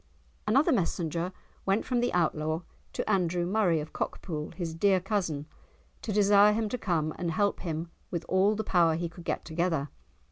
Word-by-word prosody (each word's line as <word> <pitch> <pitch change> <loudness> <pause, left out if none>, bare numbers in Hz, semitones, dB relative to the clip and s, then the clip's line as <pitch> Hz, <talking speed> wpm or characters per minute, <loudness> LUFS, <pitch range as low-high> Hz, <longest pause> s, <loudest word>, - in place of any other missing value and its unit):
Another 275 +10 +4
messenger 170 - 0 0.3
went 195 +3 +1
from 250 -2 0
the 245 +1 +1
Outlaw 155 -1 0 0.3
to - - -3
Andrew 180 -4 +1
Murray 185 -4 +2
of 150 +1 -7
Cockpool, 155 -4 -4
his 170 -3 -3
dear 190 +3 +3
cousin, 180 -7 -2 0.6
to 220 - -4
desire 205 0 +6
him 220 0 0
to 250 - -2
come 160 -6 0
and 175 - -1
help 200 +5 +1
him 165 -1 -4 0.2
with 170 -2 -3
all 195 +3 +3
the 220 - -2
power 170 -5 +3
he 170 +1 -2
could 170 0 -13
get - - -2
together. 160 -3 -1
180 Hz, 175 wpm, -29 LUFS, 165-205 Hz, 0.6 s, desire